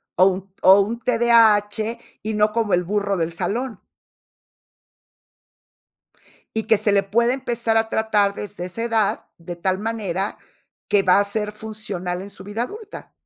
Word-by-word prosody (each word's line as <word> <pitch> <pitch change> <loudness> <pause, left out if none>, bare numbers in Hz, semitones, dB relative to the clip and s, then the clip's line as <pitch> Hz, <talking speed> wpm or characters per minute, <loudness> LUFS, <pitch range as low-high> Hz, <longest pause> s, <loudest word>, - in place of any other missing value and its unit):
o 185 - +5
un 190 0 -1
o 190 +2 +7
un 225 +4 -2
TDAH, 230 -2 +3 0.2
y 220 +1 -3
no 210 0 +3
como 220 -4 0
el 180 0 +3
burro 200 +1 -1
del 165 0 -2
salón. 215 +6 -3 2.8
Y 220 - 0
que 220 -1 +4
se 210 0 +1
le 200 0 +4
puede 235 +5 +1
empezar 235 -4 -1
a 225 0 +1
tratar 210 -3 +1
desde 205 -3 -6
esa 185 +6 -5
edad, 225 -3 0
de 175 +1 -7
tal 185 +2 -1
manera 205 -3 -3 0.5
que 205 -1 +3
va 185 0 +4
a - - +3
ser 210 +1 -2
funcional 210 -5 -5
en 200 - -9
su 195 -1 -11
vida 205 +4 -3
adulta. 420 - -9
210 Hz, 160 wpm, -22 LUFS, 195-225 Hz, 2.8 s, o